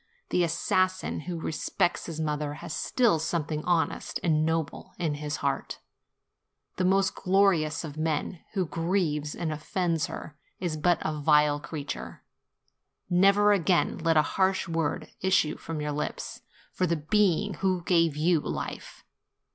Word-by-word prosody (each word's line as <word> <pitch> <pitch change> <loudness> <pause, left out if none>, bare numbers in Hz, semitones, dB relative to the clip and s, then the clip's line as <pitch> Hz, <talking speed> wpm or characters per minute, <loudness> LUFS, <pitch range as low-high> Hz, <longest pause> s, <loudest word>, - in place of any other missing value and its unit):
The 180 - +2
assassin 185 +3 0
who 170 -2 -3
respects 160 +2 -1
his 165 -2 -5
mother 150 -1 -2
has 165 0 -7
still 225 - +2
something 160 -1 -2
honest 175 -2 0
and 155 -3 +3
noble 160 -2 -2
in 165 -4 -1
his 150 0 -3
heart; - - -1 1.0
the 185 - 0
most 195 +1 +3
glorious 180 -6 +2
of 155 -2 -7
men 160 +2 -1
who 190 -3 +1
grieves 165 -3 -1
and 165 -2 -2
offends 165 +1 -1
her 150 - -8 0.2
is 175 -4 -2
but 175 +3 +2
a 155 - -1
vile 150 -1 +3
creature. 145 -1 -6 0.9
Never 200 +3 +5
again 180 -3 +2
let 165 -1 +2
a 155 - +6
harsh 190 +4 +1
word 165 -3 -1
issue 185 -5 +2
from 160 -2 -5
your 150 0 -2
lips, 150 +1 -4 0.3
for 185 - 0
the 170 0 +1
being 195 +4 +2
who 185 -2 +1
gave 165 -4 +3
you 165 +2 +3
life. - - -6
165 Hz, 145 wpm, -28 LUFS, 155-185 Hz, 1.0 s, a